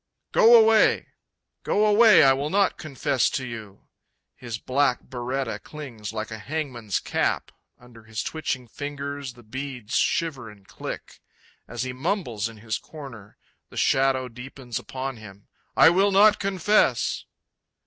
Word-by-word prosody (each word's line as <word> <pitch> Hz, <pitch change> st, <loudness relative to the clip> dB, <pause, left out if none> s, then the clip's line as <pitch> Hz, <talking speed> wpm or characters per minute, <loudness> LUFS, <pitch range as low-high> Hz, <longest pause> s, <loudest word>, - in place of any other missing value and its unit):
Go 235 Hz, +1 st, +7 dB
away! 220 Hz, 0 st, +4 dB, 0.5 s
Go 210 Hz, -, +1 dB
away; 215 Hz, -3 st, +7 dB
I 135 Hz, -1 st, +6 dB
will 140 Hz, +3 st, -2 dB
not 195 Hz, +2 st, +1 dB
confess 140 Hz, -3 st, 0 dB
to 130 Hz, -, -3 dB
you! 110 Hz, -5 st, -9 dB, 0.5 s
His 120 Hz, -3 st, -6 dB
black 130 Hz, +1 st, +1 dB
biretta 125 Hz, 0 st, -4 dB
clings 125 Hz, -9 st, -8 dB
like 110 Hz, 0 st, -5 dB
a 110 Hz, -, -6 dB
hangman's 125 Hz, -6 st, -3 dB
cap; -, -, -1 dB, 0.3 s
under 120 Hz, -2 st, -16 dB
his 110 Hz, 0 st, -4 dB
twitching 135 Hz, -6 st, -3 dB
fingers 140 Hz, 0 st, -6 dB
the 120 Hz, 0 st, -17 dB
beads 125 Hz, -1 st, -7 dB
shiver 140 Hz, -9 st, 0 dB
and 100 Hz, -2 st, -17 dB
click, -, -, -8 dB, 0.5 s
As -, -, -4 dB
he 125 Hz, -1 st, -4 dB
mumbles 125 Hz, -, -2 dB
in 115 Hz, -, -13 dB
his 110 Hz, 0 st, -3 dB
corner, 130 Hz, -10 st, -11 dB, 0.3 s
the -, -, -12 dB
shadow 135 Hz, -1 st, +2 dB
deepens 125 Hz, 0 st, -7 dB
upon 130 Hz, -1 st, -5 dB
him; 100 Hz, -2 st, -13 dB, 0.3 s
I -, -, +8 dB
will 195 Hz, +3 st, +3 dB
not 210 Hz, +2 st, +6 dB
confess!... 195 Hz, +1 st, +1 dB
130 Hz, 140 wpm, -25 LUFS, 115-155 Hz, 0.5 s, I